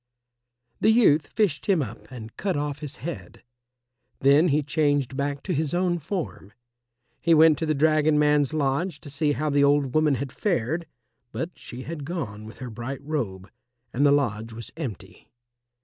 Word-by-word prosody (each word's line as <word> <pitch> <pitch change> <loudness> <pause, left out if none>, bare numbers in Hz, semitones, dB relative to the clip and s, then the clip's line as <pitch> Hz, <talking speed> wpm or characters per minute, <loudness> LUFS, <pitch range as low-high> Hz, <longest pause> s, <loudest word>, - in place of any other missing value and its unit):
The - - +3
youth 200 -10 +4
fished 205 -10 0
him 185 -7 +3
up 115 -1 -10
and 115 -3 -9
cut 190 -6 -1
off 145 0 -3
his 150 -1 -7
head. 170 - -7 0.7
Then 140 +5 +5
he 150 -1 +2
changed 145 -3 +1
back 140 0 -2
to 185 - -2
his 155 +1 -1
own 175 -1 +1
form. 160 - -5 0.7
He 165 -1 +4
went 155 -1 +6
to 160 - -1
the 155 - +1
dragon 155 +1 +3
man's 150 -2 +3
lodge 155 +3 -1
to 145 - -10
see 145 +1 +1
how 150 +1 -1
the 140 0 +3
old 140 -2 +3
woman 155 -2 +3
had 135 +1 -4
fared, 165 - -1 0.4
but 165 +2 -4
she 125 +2 -9
had 155 -1 -6
gone 130 - -5
with 110 - -11
her 125 -3 -7
bright 125 +5 -6
robe, 105 -11 -4 0.4
and 135 - +1
the 145 - +6
lodge 115 -6 0
was 115 0 -8
empty. 130 - -7
145 Hz, 175 wpm, -25 LUFS, 135-160 Hz, 0.7 s, went